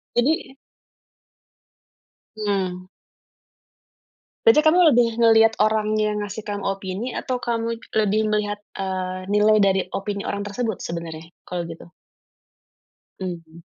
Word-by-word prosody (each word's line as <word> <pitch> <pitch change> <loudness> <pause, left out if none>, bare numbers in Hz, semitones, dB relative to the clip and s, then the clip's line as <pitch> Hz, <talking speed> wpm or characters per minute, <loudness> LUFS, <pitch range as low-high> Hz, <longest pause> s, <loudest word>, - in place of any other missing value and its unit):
Jadi? 265 +2 +1 1.8
Mmm. 190 -3 -2 1.6
Berarti 455 -10 +7
kamu 320 +3 +5 0.2
lebih 240 -1 +5
ngeliat 225 -1 +6
orang 215 0 +2
yang 210 -1 0
ngasih 205 +1 -6
kamu 205 -1 -4
opini 195 +4 -3
atau 255 -1 -2
kamu 230 -1 -1
it 230 - -17
lebih 215 0 +2
melihat, 205 -1 -1
eee, 185 -1 -4
nilai 210 +1 +4
dari 195 -2 +3
opini 200 0 -3
orang 205 0 -3
tersebut 220 0 -3
sebenarnya, 165 -1 -6 0.2
kalau 175 -2 -4
gitu? 165 +1 -10 1.3
Mhm. 170 -3 -7
205 Hz, 115 wpm, -23 LUFS, 185-225 Hz, 1.8 s, Berarti